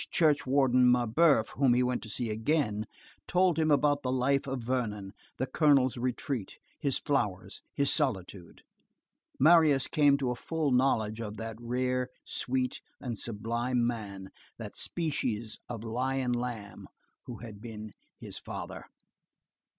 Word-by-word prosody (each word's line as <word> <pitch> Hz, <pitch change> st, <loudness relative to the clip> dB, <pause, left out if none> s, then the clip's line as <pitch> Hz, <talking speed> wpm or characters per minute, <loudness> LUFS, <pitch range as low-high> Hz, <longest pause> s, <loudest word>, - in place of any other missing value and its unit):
Church 150 Hz, -4 st, +2 dB
warden 130 Hz, -2 st, +4 dB
Mabeuf, 125 Hz, +1 st, +3 dB
whom 130 Hz, -3 st, +3 dB
he 125 Hz, -, +3 dB
went 125 Hz, 0 st, -1 dB
to 110 Hz, -, -9 dB
see 115 Hz, +2 st, -3 dB
again, 110 Hz, -2 st, 0 dB, 0.4 s
told 180 Hz, -2 st, +3 dB
him 155 Hz, -1 st, +2 dB
about 145 Hz, -1 st, +3 dB
the 125 Hz, -, -2 dB
life 135 Hz, +2 st, +1 dB
at 135 Hz, 0 st, -2 dB
Vernon, 115 Hz, -5 st, -3 dB, 0.2 s
the 130 Hz, -, 0 dB
colonel's 140 Hz, -3 st, +3 dB
retreat, 125 Hz, -2 st, -3 dB, 0.2 s
his 140 Hz, -2 st, +1 dB
flowers, 105 Hz, -10 st, -2 dB
his 140 Hz, 0 st, +3 dB
solitude. 95 Hz, -, -2 dB, 0.8 s
Marius 155 Hz, -2 st, +6 dB
came 145 Hz, -2 st, +4 dB
to 130 Hz, -3 st, -1 dB
a -, -, -2 dB
full 155 Hz, +2 st, -2 dB
knowledge 115 Hz, -4 st, +2 dB
of 110 Hz, -1 st, -6 dB
that 115 Hz, -1 st, -6 dB
rare, 125 Hz, +1 st, -1 dB, 0.2 s
sweet, 130 Hz, 0 st, -2 dB, 0.2 s
and 120 Hz, -5 st, -4 dB
sublime 120 Hz, +2 st, -1 dB
man, 100 Hz, -5 st, -4 dB, 0.3 s
that -, -, -8 dB
species 125 Hz, -10 st, -2 dB
of 115 Hz, -3 st, -5 dB
lion 125 Hz, +2 st, -1 dB
lamb 120 Hz, -4 st, -5 dB, 0.4 s
who 120 Hz, -, -6 dB
had 110 Hz, -3 st, -10 dB
been 110 Hz, -2 st, -8 dB, 0.3 s
his -, -, -7 dB
father. -, -, -7 dB
125 Hz, 140 wpm, -30 LUFS, 110-140 Hz, 0.8 s, Marius